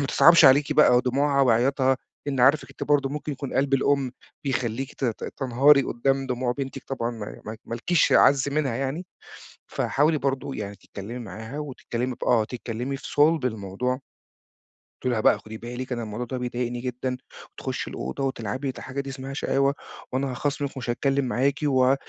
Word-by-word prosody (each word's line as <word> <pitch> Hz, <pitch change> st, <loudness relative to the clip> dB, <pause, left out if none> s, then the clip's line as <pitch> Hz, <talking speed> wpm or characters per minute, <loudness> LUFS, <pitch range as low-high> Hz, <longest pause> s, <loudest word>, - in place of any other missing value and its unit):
ما 140 Hz, -, 0 dB
تصعبش 170 Hz, +2 st, +7 dB
عليكِ 140 Hz, +2 st, +6 dB
بقى 145 Hz, -5 st, +6 dB
دموعها 140 Hz, +2 st, +2 dB
وعياطها، 130 Hz, +2 st, +3 dB, 0.3 s
إن 135 Hz, -3 st, -1 dB
عارفِك 140 Hz, +4 st, +4 dB
أنتِ -, -, -6 dB
برضه 145 Hz, -2 st, +2 dB
ممكن 150 Hz, +1 st, -4 dB
يكون 140 Hz, 0 st, -6 dB
قلب 135 Hz, 0 st, +2 dB
الأُم، 135 Hz, -1 st, +1 dB, 0.3 s
بيخلّيكِ 130 Hz, 0 st, -2 dB
ت 135 Hz, -, -4 dB
ت 115 Hz, -3 st, -2 dB
تنهاري 135 Hz, +2 st, +5 dB
قُدّام 135 Hz, +3 st, 0 dB
دموع 125 Hz, -1 st, -1 dB
بنتِك 135 Hz, +1 st, -5 dB
طبعًا 120 Hz, -3 st, -2 dB
ما 110 Hz, -3 st, -8 dB
ما 110 Hz, +1 st, -5 dB
ما 115 Hz, -, -5 dB
لكيش 165 Hz, +7 st, +2 dB
أعز 140 Hz, 0 st, +5 dB
منها 140 Hz, -4 st, 0 dB
يعني، 135 Hz, +7 st, -3 dB, 0.6 s
فحاولي 150 Hz, +2 st, +1 dB
برضه 135 Hz, 0 st, -2 dB
يعني 100 Hz, -1 st, -5 dB
تتكلّمي 105 Hz, +6 st, -8 dB
معاها 115 Hz, +3 st, -7 dB
وتتكلّمي 125 Hz, -3 st, -4 dB
ب -, -, -6 dB
آه، 115 Hz, -3 st, +3 dB
تتكلّمي 125 Hz, +3 st, -4 dB
في -, -, -9 dB
صُلب 155 Hz, 0 st, +3 dB
الموضوع. 110 Hz, +4 st, -2 dB, 1.0 s
تقولي 125 Hz, -1 st, 0 dB
لها 110 Hz, -, 0 dB
بقى -, -, +4 dB
خُدي 110 Hz, 0 st, -9 dB
بالك 125 Hz, +3 st, -6 dB
أنا 120 Hz, -, -3 dB
الموضوع 110 Hz, +3 st, -4 dB
ده 130 Hz, +2 st, -4 dB
بيضايقني 120 Hz, 0 st, -3 dB
جدًا، 125 Hz, 0 st, -3 dB, 0.4 s
تخُشي -, -, -4 dB
الأوضة 65 Hz, -, -4 dB
وتلعبي 130 Hz, 0 st, -2 dB
ودي 130 Hz, -, -5 dB
حاجة 135 Hz, +2 st, -4 dB
دي 140 Hz, -, -7 dB
اسمها 135 Hz, 0 st, -6 dB
شقاوة، 140 Hz, 0 st, +1 dB, 0.4 s
وأنا 135 Hz, +1 st, -1 dB
هاخاصمِك 140 Hz, +2 st, -2 dB
ومش 125 Hz, -, -5 dB
هاتكلّم 135 Hz, +3 st, +1 dB
معاكِ 135 Hz, +3 st, +1 dB
و 130 Hz, -2 st, +4 dB
130 Hz, 175 wpm, -25 LUFS, 120-140 Hz, 1.0 s, تصعبش